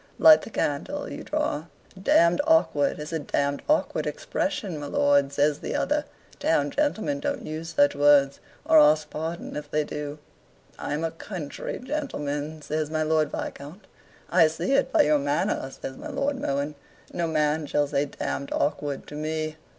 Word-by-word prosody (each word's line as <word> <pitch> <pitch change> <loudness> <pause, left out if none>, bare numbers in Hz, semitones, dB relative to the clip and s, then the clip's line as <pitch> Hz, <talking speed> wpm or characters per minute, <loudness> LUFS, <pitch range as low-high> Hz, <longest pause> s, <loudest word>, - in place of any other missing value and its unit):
Light 315 -1 +8
the - - -9
candle, 225 - -2
you - - -6
drawer." 300 - -2 0.3
"Damned 170 +2 +4
awkward 235 - +3
is 150 +2 -7
a 160 - 0
damned 140 0 -1
awkward 305 - +1
expression, 200 - -3
my 145 - -5
lord," 140 -1 +3
says 145 +1 +1
the - - -4
other. 295 0 0 0.3
"Town 145 -3 +1
gentlemen 290 -1 0
don't 285 0 -3
use 160 +2 -6
such 145 -1 +4
words 140 -1 +4 0.3
or 160 - +7
ask 150 0 +4
pardon 165 +2 -5
if 150 0 -6
they 150 0 +1
do." 150 0 -5 0.6
"I'm 150 +3 -3
a 165 - -1
country 165 -3 -6
gentleman," 155 - -4
says 155 0 -2
my 155 0 0
Lord 155 -1 +2
Viscount. 160 +8 -7 0.5
"I 160 - +6
see 160 +11 -3
it 275 - +2
by - - +5
your 150 0 +3
manner," 145 -1 -1
says 135 0 -8
my 305 - -7
Lord 275 -1 -1
Mohun. 140 - -1 0.4
"No 170 -1 -1
man 155 -1 +1
shall 145 0 +1
say 140 0 0
damned 140 0 -4
awkward 145 -1 -1
to - - -11
me." 155 +1 -3
155 Hz, 165 wpm, -26 LUFS, 145-175 Hz, 0.6 s, Light